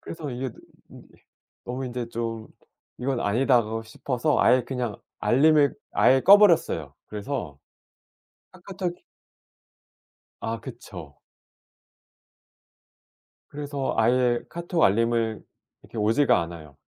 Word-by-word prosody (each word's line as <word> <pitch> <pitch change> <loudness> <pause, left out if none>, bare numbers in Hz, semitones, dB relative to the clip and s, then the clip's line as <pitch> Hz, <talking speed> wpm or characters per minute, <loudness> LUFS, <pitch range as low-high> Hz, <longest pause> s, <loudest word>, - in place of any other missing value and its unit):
그래서 155 -4 -7
이게 125 +1 -4 0.4
이 - - -13 0.6
너무 130 +2 -4
인제 120 -1 -5
좀 115 -1 -5 0.5
'이건 130 -1 -2
아니다.' 120 +3 +3 0.2
싶어서 135 +5 -1
아예 125 0 +4
그냥 125 -5 -3 0.2
알림을 145 +2 +4 0.2
아예 130 +1 +4
꺼버렸어요. 170 - +5
그래서 105 - -5 0.9
카카톡이 185 -1 -6 1.4
아. 115 0 -4
그쵸. 90 - -10 2.3
그래서 145 -2 -4
아예 120 +1 +2
카톡 170 0 -2
알림을 115 +1 +2 0.4
이렇게 115 - -10
오지가 110 +1 +3
않아요. 80 -4 -10
125 Hz, 220 characters per minute, -25 LUFS, 110-140 Hz, 2.3 s, 꺼버렸어요